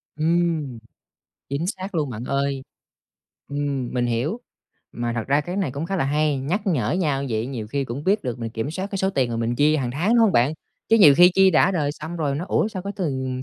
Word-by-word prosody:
Ừm, 160 -5 0 0.7
chính 140 +5 -2
xác 190 0 -5
luôn, 150 -5 -1
bạn 120 +1 -6
ơi! 140 0 -1 0.9
Ừm, 140 -3 -2
mình 120 -1 +1
hiểu. 125 - -1 0.5
Mà 120 0 -3
thật 115 -2 -3
ra 140 +2 +3
cái 175 +5 -5
này 185 -9 0
cũng 145 +5 -4
khá 195 - -2
là 135 - +1
hay, 150 0 +1
nhắc 160 +11 -1
nhở 130 - +1
nhau 150 -7 0
vậy 110 +1 -1
nhiều 120 -6 -5
khi 140 +4 -2
cũng 130 +5 -6
biết 205 +3 +2
được 125 -1 -3
mình 115 -1 -4
kiểm 115 +6 -3
soát 190 +4 -4
cái 195 - -3
số 190 +1 +1
tiền 130 -8 0
mà 115 - -2
mình 115 +1 -1
chi 150 +1 +4
hàng 130 -5 -2
tháng, 160 - -1
đúng 240 - +5
hông 225 -4 +4
bạn? 125 +5 +3 0.4
Chứ 225 - +5
nhiều 150 -8 +8
khi 180 +1 +8
chi 190 0 +6
đã 175 +2 +4
đời 150 -6 0
xong 160 +3 -7
rồi 145 -4 -1
nói: 170 +6 -4
"Ủa, 215 - +2
sao 185 -4 -6
cái 200 +1 -4
tiền 130 -7 -2
145 Hz, 240 wpm, -23 LUFS, 130-175 Hz, 0.9 s, nhiều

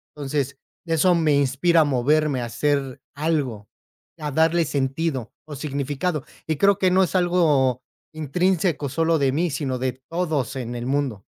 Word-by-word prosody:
Entonces, 140 -1 -2 0.3
eso 170 +2 +3
me 155 -3 +2
inspira 145 +5 +3
a - - +6
moverme, 145 0 +1
a 120 - -2
hacer 135 +1 -1
algo, 140 -9 -2 0.5
a 150 -2 -3
darle 160 +3 +3
sentido 135 -2 -2 0.2
o 150 - -7
significado. 145 +2 -2 0.2
Y 160 - 0
creo 200 +2 +3
que 185 - +3
no 190 +1 +4
es 185 - -2
algo 150 -9 +2 0.3
intrínseco 160 0 0
solo 165 +3 +1
de 135 -2 +2
mí, 170 +5 0
sino 135 -3 -2
de 130 -1 -1 0.2
todos 160 -7 -1
en 120 -1 -5
el 120 0 -4
mundo. 130 -7 -2
145 Hz, 160 wpm, -23 LUFS, 135-165 Hz, 0.5 s, a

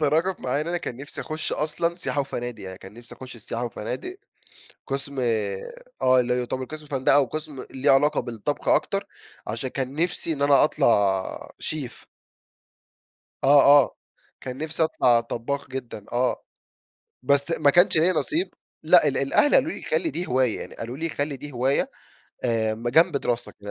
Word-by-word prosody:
تطرَّقت 160 +5 +1
معايا 130 +3 -1
إن - - -8
أنا 175 0 -1
كان 125 -8 -6
نفسي 145 +2 -8
أخُش 155 0 -4
أصلًا 170 +3 -1
سياحة 145 -5 -2
وفنادق، 120 -5 -5
يعني 95 0 -8
كان 95 +1 -12
نفسي 120 0 -13
أخُش 130 -1 -10
السياحة 115 +1 -5
وفنادق 125 - -5 0.7
قسم 140 0 -3
آآ، 110 -5 0 0.4
آه، 130 0 +5
اللي 125 0 +1
هو 125 - 0
يُعتبر 130 +1 -3
قسم 155 +1 -9
فندقة 140 0 +3
وقسم 150 +1 -4
ليه 135 +2 +3
علاقة 145 +2 +4
بالطَّبخ 115 -4 -4
أكتر، - - +1 0.4
عشان 115 +5 -3
كان 130 +1 -4
نفسي 165 +1 0
إن 140 - -7
أنا 140 -1 +5
أطلع 100 -9 +1
شيف. 145 -6 -5 1.4
آه، 140 +1 +7 0.2
آه. - - -8 0.5
كان 130 0 -6
نفسي 160 +2 -1
أطلَع 125 -6 +3
طبَّاخ 130 +5 -4
جدًا، 120 -6 -7
آه. 125 +2 0 0.8
بس 140 +4 +1
ما 155 -3 +3
كانش 175 +2 +5
ليّا 175 +4 +4
نصِيب. 325 - -1 0.3
لأ، - - +6
ال - - 0
الأهل 290 - +3
قالوا 310 +6 +3
لي: - - -8
"خلِّ 465 -10 0
دي 180 -6 -3
هِواية." 125 -2 +1
يعني - - -9
قالوا 120 +3 -6
لي: 165 +2 -2
"خلِّ 145 -1 -3
دي 145 +2 -8
هِواية 130 +3 +1 0.6
آآ، 110 -2 +1
ما 120 +2 -4
جنب 160 0 +4
دِراستك." 120 -3 -3
135 Hz, 170 wpm, -24 LUFS, 120-155 Hz, 1.4 s, آه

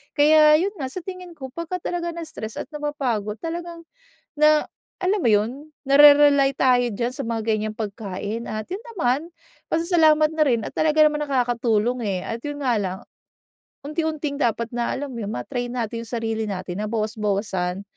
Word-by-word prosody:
Kaya 305 +1 +6
yun 390 +4 0
nga 265 - -2
sa 370 - -6
tingin 365 -1 -8
ko 265 -4 -8
pagka 335 +2 -4
talaga 345 -1 -2
na-stress 315 -10 -6
at - - -5
napapagod 260 -8 -2
talagang, 335 0 -5 0.5
na 305 0 +5 0.4
alam 385 +3 +1
mo - - +3
yun, 210 +1 +3 0.4
narerely 285 -1 +7
tayo 245 -2 +3
dyan 235 +4 -2
sa 280 - -4
mga 230 -1 -2
ganyang 215 0 -3
pagkain 210 +1 -5
at 215 0 -4
yun 385 +3 -4
naman 290 0 0 0.4
pasasalamat 320 -2 +4
na 310 - +4
rin 240 -5 +2
at - - -9
talaga 310 0 +4
naman 300 0 +1
nakakatulong 245 -3 +1
eh 195 -4 -1
at 225 - -4
yun 290 0 -5
nga 250 -3 +2
lang. 190 -1 -3 0.9
Unti-unting 305 -1 -2
dapat 235 -2 0
na 240 0 -1
alam 285 +1 -5
yun 225 -3 -4
ma-train 245 - -3
natin 230 -2 -3
yung - - -9
sarili 225 -1 -2
natin 185 -2 -5
na - - -2
bawas-bawasan 205 -4 -2
255 Hz, 165 wpm, -23 LUFS, 220-305 Hz, 0.9 s, narerely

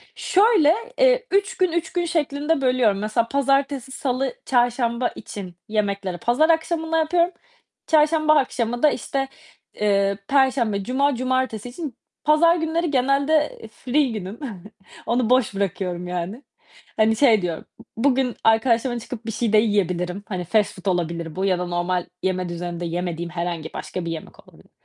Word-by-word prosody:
Şöyle, 385 -6 +4 0.2
eee, - - +4
3 395 0 +1
gün, 370 -2 +2
3 340 -1 -2
gün 350 -1 0
şeklinde 295 -2 0
bölüyorum. 250 -6 +2
Mesela 215 +2 0
pazartesi, 275 -1 0
salı, 260 -1 -2
çarşamba 245 -1 +1
için 185 -4 -8
yemekleri 200 -4 -1
pazar 250 - +2
akşamından 325 0 +1
yapıyorum. 340 +2 +2 0.6
Çarşamba 310 0 +4
akşamı 245 -3 0
da, 300 - +7
işte, 270 +1 -2 0.5
eee, 200 -1 +1
perşembe, 255 -7 +2
cuma, 275 +5 +1
cumartesi 255 -2 -1
için 280 -2 -7 0.3
pazar 335 +3 +5
günleri 330 0 -1
genelde 280 +3 +2
free 275 +3 +1
günüm. 205 0 -6 0.7
Onu 240 -1 +1
boş 250 -5 +3
bırakıyorum 180 -2 -2
yani. 180 +8 -4 0.5
Hani 220 0 +3
şey 225 -4 +4
diyorum, 170 -3 -4
b - - -13 0.2
bugün 265 -3 +2
arkadaşımla 230 +2 +2
çıkıp 235 0 -8
bir 225 - -3
şey 225 -1 -1
de - - +7
yiyebilirim. 195 -3 0
Hani 185 -3 -3
fast 210 +4 +1
food - - -33
olabilir 170 -2 -3
bu 190 +1 -1
ya 185 -2 +1
da 180 - -2
normal 175 0 -1 0.2
yeme 185 -1 -1
düzeninde 175 0 -5
yemediğim 170 0 -3
herhangi 170 -2 -4
başka 180 -2 -5
bir 165 - -3
yemek 160 -1 -9
olabilir. - - -20
240 Hz, 150 wpm, -22 LUFS, 195-285 Hz, 0.7 s, da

